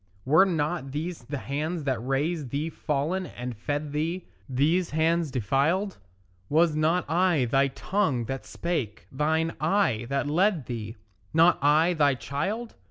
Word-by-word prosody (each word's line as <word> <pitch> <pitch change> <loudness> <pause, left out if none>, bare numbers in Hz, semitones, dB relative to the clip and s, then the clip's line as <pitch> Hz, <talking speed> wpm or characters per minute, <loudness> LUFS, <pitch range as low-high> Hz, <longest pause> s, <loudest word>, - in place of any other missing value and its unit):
Were 155 +8 +6
not 155 -4 -2
these 155 -3 -4
the 140 +3 -4
hands 150 +5 -3
that 130 -5 -1
raised 140 +2 -1
thee 150 +5 -2
fallen 155 +6 -1
and 125 -1 -6
fed 145 +7 -3
thee, 165 +5 -2 0.2
These 160 +7 +2
hands 160 +1 +1
defiled? 140 - 0 0.5
Was 160 +1 +3
not 160 +3 +1
I 170 -3 +2
thy 135 +3 +3
tongue 140 - -1
that 135 +3 -4
spake, 135 - -3
thine 160 +4 0
eye 155 - +1
that 140 +1 0
led 170 - +2
thee, 110 -2 -5 0.4
Not 165 +2 +5
I 155 +4 +4
thy 145 -4 +3
child? 190 - -3
150 Hz, 145 wpm, -27 LUFS, 135-170 Hz, 0.5 s, Were